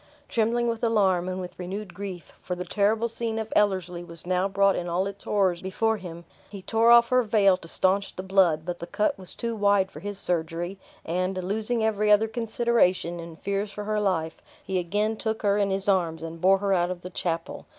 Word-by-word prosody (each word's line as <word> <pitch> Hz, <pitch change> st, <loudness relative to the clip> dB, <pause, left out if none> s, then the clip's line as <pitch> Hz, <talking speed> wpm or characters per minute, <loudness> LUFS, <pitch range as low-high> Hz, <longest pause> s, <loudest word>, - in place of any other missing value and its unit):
Trembling 235 Hz, +1 st, +1 dB
with 230 Hz, 0 st, -2 dB
alarm, 190 Hz, -6 st, +2 dB
and 185 Hz, 0 st, -3 dB
with 180 Hz, 0 st, -8 dB
renewed 190 Hz, +1 st, -5 dB
grief 185 Hz, -2 st, -7 dB
for 180 Hz, -, -4 dB
the 180 Hz, 0 st, -5 dB
terrible 215 Hz, +4 st, +1 dB
scene 230 Hz, -1 st, -3 dB
of 220 Hz, 0 st, -4 dB
Ellerslie 185 Hz, -4 st, +1 dB
was 170 Hz, -1 st, -9 dB
now 185 Hz, +1 st, +1 dB
brought 195 Hz, 0 st, +3 dB
in 175 Hz, -, -3 dB
all 180 Hz, +3 st, 0 dB
its 200 Hz, 0 st, -7 dB
horrors 190 Hz, -4 st, +1 dB
before 220 Hz, +4 st, 0 dB
him 170 Hz, -3 st, -9 dB, 0.2 s
he 200 Hz, -2 st, -9 dB
tore 225 Hz, +3 st, +3 dB
off 235 Hz, 0 st, +7 dB
her 255 Hz, 0 st, +4 dB
veil 210 Hz, -4 st, +4 dB
to 165 Hz, -, -11 dB
staunch 195 Hz, +3 st, 0 dB
the 185 Hz, -, -5 dB
blood; 185 Hz, -5 st, +3 dB
but 175 Hz, -1 st, -4 dB
the 170 Hz, -, -6 dB
cut 210 Hz, +4 st, 0 dB
was 185 Hz, -, -6 dB
too 230 Hz, -1 st, -3 dB
wide 200 Hz, -2 st, +2 dB
for -, -, -10 dB
his 205 Hz, 0 st, -5 dB
surgery; 175 Hz, +1 st, -2 dB, 0.3 s
and, 185 Hz, +3 st, -1 dB
losing 220 Hz, +4 st, -1 dB
every 210 Hz, -1 st, +1 dB
other 210 Hz, +2 st, +5 dB
consideration 220 Hz, -6 st, +1 dB
in 165 Hz, -1 st, -8 dB
fears 200 Hz, +4 st, -3 dB
for 210 Hz, -, -6 dB
her 215 Hz, 0 st, -1 dB
life, 165 Hz, -5 st, -1 dB, 0.3 s
he 190 Hz, -1 st, -1 dB
again 210 Hz, +5 st, -1 dB
took 220 Hz, 0 st, -3 dB
her 205 Hz, 0 st, +2 dB
in 200 Hz, -1 st, +2 dB
his 195 Hz, 0 st, -2 dB
arms, 170 Hz, -5 st, +1 dB
and 165 Hz, 0 st, -7 dB
bore 190 Hz, +1 st, +5 dB
her 200 Hz, 0 st, 0 dB
out 175 Hz, -1 st, +2 dB
of 180 Hz, -1 st, -5 dB
the 180 Hz, -, -8 dB
chapel. 165 Hz, -1 st, -4 dB
195 Hz, 215 wpm, -26 LUFS, 180-215 Hz, 0.3 s, off